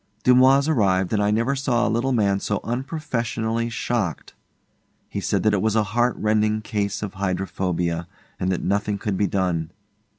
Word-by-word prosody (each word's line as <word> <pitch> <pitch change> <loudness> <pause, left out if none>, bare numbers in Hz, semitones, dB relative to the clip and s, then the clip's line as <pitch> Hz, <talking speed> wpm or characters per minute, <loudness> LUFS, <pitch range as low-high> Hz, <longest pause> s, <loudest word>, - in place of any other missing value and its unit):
Dumoise 130 +3 +5
arrived, 95 - +2
and 105 - +2
I 105 - +2
never 115 +6 +1
saw 125 -4 +1
a 110 - 0
little 120 +4 0
man 100 -5 +2
so 105 0 -1
unprofessionally 120 -4 -2
shocked. 115 -7 -2 0.7
He - - -4
said - - 0
that 110 - +3
it 100 - +1
was 110 -1 +1
a 110 - +3
heart 120 +1 +2
rending 110 0 +1
case 100 -1 -2
of 100 - -5
hydrophobia, 90 -3 -2 0.3
and 90 - 0
that 90 - -2
nothing 100 +1 0
could 100 0 -2
be 100 +1 +1
done. 90 -5 -1
105 Hz, 170 wpm, -23 LUFS, 95-120 Hz, 0.7 s, Dumoise